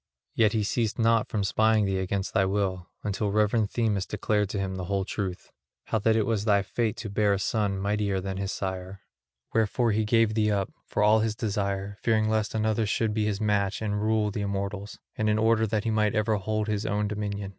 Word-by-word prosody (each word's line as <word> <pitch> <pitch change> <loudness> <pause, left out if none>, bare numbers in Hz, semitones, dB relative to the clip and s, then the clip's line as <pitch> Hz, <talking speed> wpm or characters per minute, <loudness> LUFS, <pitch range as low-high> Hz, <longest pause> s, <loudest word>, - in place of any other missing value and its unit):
Yet 110 -2 +3
he 110 -2 +1
ceased 110 +1 -1
not 115 -1 +3
from 105 -2 -1
spying 110 +2 +3
thee 95 -1 0
against 95 +1 -2
thy 95 - +3
will, 95 -2 -1
until 105 0 -1
reverend 105 +1 +2
Themis 105 -5 0
declared 105 -1 0
to 105 - -3
him 95 -1 -2
the 90 -1 -4
whole 95 +1 -1
truth, 95 -3 -4 0.3
how 110 - -1
that 110 +2 +2
it 110 -2 +2
was 110 -3 0
thy 100 -2 +3
fate 115 +1 -1
to 110 - -5
bear 105 0 +2
a 100 - -1
son 100 -1 0
mightier 100 0 0
than 95 0 -4
his 100 0 -2
sire; 95 0 -5 0.5
wherefore 115 +2 +2
he 110 +1 +1
gave 115 0 +3
thee 105 -1 +2
up, 100 -2 -1
for - - 0
all 105 +1 +5
his 110 0 0
desire, 100 -2 -2
fearing 110 -1 +2
lest 110 0 0
another 110 0 +1
should 110 0 0
be 105 -1 0
his 105 -1 -1
match 105 -2 0
and 105 -1 -2
rule 110 -1 +1
the 105 - -3
immortals, 100 0 -4 0.2
and 110 0 +1
in 105 - +2
order 110 0 +3
that 105 0 -1
he 115 - 0
might 105 -1 +1
ever 110 0 +2
hold 110 +2 -1
his 105 0 -1
own 105 +1 0
dominion. 100 -1 -3
105 Hz, 220 wpm, -27 LUFS, 100-110 Hz, 0.5 s, all